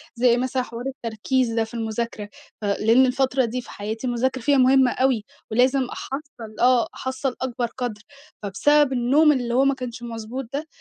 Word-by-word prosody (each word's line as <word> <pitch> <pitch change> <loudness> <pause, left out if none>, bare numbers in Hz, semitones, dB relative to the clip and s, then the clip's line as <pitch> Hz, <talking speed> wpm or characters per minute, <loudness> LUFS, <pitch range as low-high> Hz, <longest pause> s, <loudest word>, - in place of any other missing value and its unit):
زي 240 0 +3
مثلًا 255 +1 -1
حوار 235 -1 -8
التركيز 240 -1 -1
ده 225 - +1
في 225 +2 -10
المذاكرة. 225 -2 -4 0.3
فلإن 220 +5 +3
الفترة 260 0 +1
دي 250 +2 -3
في - - -15
حياتي 220 +5 -5
المذاكرة 260 +2 -1
فيها 280 +3 +3
مهمة 260 0 +5
أوي. 255 -5 +1 0.3
ولازم 255 +4 +3
أحصّل 255 -5 -8
آه 245 -2 +4
أحصّل 260 0 -3
أكبر 245 -2 -2
قدر، 240 -4 -4 0.4
فبسبب 290 +8 +3
النوم 275 +6 +4
اللي 245 -4 -1
هو 265 +2 +4
ما 275 - +3
كانش 245 -2 -7
مضبوط 230 +2 -6
ده، 300 +3 -3
250 Hz, 165 wpm, -23 LUFS, 230-265 Hz, 0.4 s, مهمة